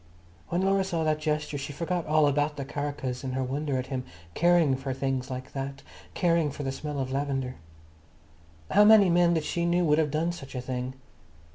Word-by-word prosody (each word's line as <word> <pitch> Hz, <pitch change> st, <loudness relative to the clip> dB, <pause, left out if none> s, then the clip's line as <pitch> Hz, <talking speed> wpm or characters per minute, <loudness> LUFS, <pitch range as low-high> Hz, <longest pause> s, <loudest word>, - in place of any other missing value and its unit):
When 175 Hz, +2 st, 0 dB
Laura 195 Hz, 0 st, +3 dB
saw 170 Hz, -4 st, -1 dB
that 155 Hz, -1 st, +1 dB
gesture 150 Hz, -1 st, -2 dB
she 140 Hz, +1 st, -5 dB
forgot 170 Hz, +3 st, -2 dB
all 155 Hz, 0 st, +4 dB
about 145 Hz, +1 st, 0 dB
the 140 Hz, -, -4 dB
karakas 140 Hz, -2 st, -4 dB
in 130 Hz, -1 st, -3 dB
her 130 Hz, 0 st, -1 dB
wonder 140 Hz, +1 st, -2 dB
at 130 Hz, -, -2 dB
him 130 Hz, -1 st, -2 dB, 0.3 s
caring 170 Hz, -, +4 dB
for 135 Hz, 0 st, -4 dB
things 135 Hz, -1 st, -2 dB
like 130 Hz, 0 st, -6 dB
that—caring 145 Hz, +4 st, -2 dB
for 145 Hz, +1 st, -6 dB
the 135 Hz, -, -1 dB
smell 150 Hz, +1 st, -5 dB
of 130 Hz, -1 st, -2 dB
lavender. 135 Hz, -2 st, -2 dB, 1.1 s
How 205 Hz, -, +6 dB
many 210 Hz, -3 st, +7 dB
men 175 Hz, 0 st, +4 dB
that 160 Hz, -, 0 dB
she 170 Hz, +2 st, -2 dB
knew 175 Hz, +1 st, +2 dB
would 150 Hz, 0 st, +3 dB
have 155 Hz, -2 st, +2 dB
done 160 Hz, +4 st, 0 dB
such 140 Hz, -6 st, -9 dB
a -, -, -2 dB
thing? 130 Hz, 0 st, -4 dB
145 Hz, 195 wpm, -27 LUFS, 135-170 Hz, 1.1 s, many